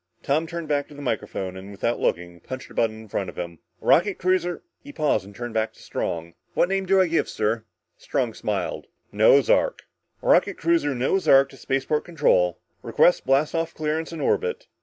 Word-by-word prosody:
Tom 155 +4 +1
turned 170 -1 -5
back 145 -1 0
to 150 - -14
the 145 - -9
microphone, 95 -6 -3
and 95 +1 -9
without 115 +4 -2
looking, 85 0 -1
punched 130 +9 -8
a - - -11
button 110 -1 0
in - - -14
front 100 -2 -3
of - - -12
him. 85 -2 -6 0.2
"Rocket 195 +3 +3
cruiser 180 -1 0
" - - -56
He 285 - -10
paused 145 - 0
and 100 0 -13
turned 120 0 -6
back 110 0 0
to - - -21
Strong. 85 0 -4 0.2
"What 175 - +3
name 195 0 -1
do 195 +1 +4
I 185 - +5
give, 165 -1 0
sir?" 110 +1 -1 0.3
Strong - - -1
smiled. - - -3 0.2
"Noah's 110 +6 +5
Ark - - +2 0.2
" - - -46
"Rocket - - +3
cruiser 165 -4 +1
Noah's 135 +10 0
Ark 135 0 +6
to - - -14
spaceport 135 +3 -1
control! 135 - +2 0.2
Request 175 - +3
blast 135 +3 +3
off 165 0 -2
clearance 155 +1 -2
and 160 -3 -5
orbit." 460 - 0
140 Hz, 200 wpm, -24 LUFS, 110-165 Hz, 0.3 s, Ark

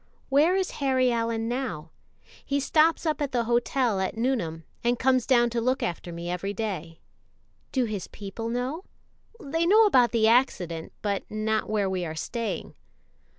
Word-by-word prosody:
"Where 300 +7 +4
is 380 -1 0
Harry 260 -2 +3
Allyn 230 -1 -1
now?" 240 - -3 0.5
"He 280 0 0
stops 315 +4 +3
up 310 -1 0
at 280 -2 -1
the 240 -1 +2
hotel 240 -2 +1
at 190 +3 -2
Nuneham, 225 -10 -1 0.2
and 240 +1 +2
comes 255 -1 +2
down 240 -2 +4
to 235 0 -1
look 255 +3 0
after 175 0 -3
me 170 0 -6
ever 180 +3 -3
day." 185 -6 -5 0.7
"Do 255 -2 +1
his 210 -5 -4
people 215 +3 -6
know?" 255 +8 -3 0.6
"They 325 +1 -1
know 435 +4 +6
about 255 - +4
the 225 -2 +3
accident, 180 -9 +1
but 200 -2 -2
not 215 0 -1
where 210 -2 +1
we 185 -1 -2
are 160 -2 -4
staying." 230 +7 -4
235 Hz, 165 wpm, -26 LUFS, 200-265 Hz, 0.7 s, know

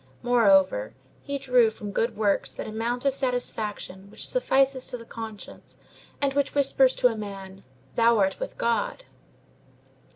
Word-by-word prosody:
Moreover, 195 - +3 0.3
he 280 0 -4
drew 250 -4 +4
from 210 -1 -8
good 230 +3 -1
works 205 -2 +1
that - - -6
amount 235 +4 -3
of 275 - +3
satisfaction 220 -7 -3
which - - -6
suffices 270 - +1
to 245 - -4
the 230 - -12
conscience, 225 -3 -9 0.4
and 280 -1 0
which 285 0 0
whispers 270 -2 +3
to - - +4
a 225 - -4
man, 195 -2 -8 0.3
"Thou 230 0 +4
art 195 -2 +1
with - - -6
God!" - - -1
230 Hz, 150 wpm, -26 LUFS, 205-265 Hz, 0.4 s, drew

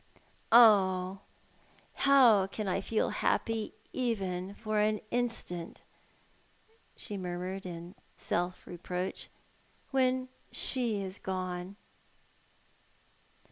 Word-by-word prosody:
"Oh, 195 -5 +6 0.7
how 245 -8 +5
can 205 +1 -5
I 190 +1 0
feel 220 +3 0
happy, 225 -1 -1 0.2
even 195 -6 -2
for 215 -1 -1
an 215 0 +2
instant," 230 -8 -3 1.1
she 205 - -4
murmured, 185 +1 -4
in 170 0 -8 0.2
self 175 +1 -2
reproach, 180 +1 -5 0.6
"when 255 -1 +2 0.2
she 230 -6 0
is 190 +1 -4
gone?" 185 0 -4
195 Hz, 85 wpm, -31 LUFS, 180-225 Hz, 1.1 s, Oh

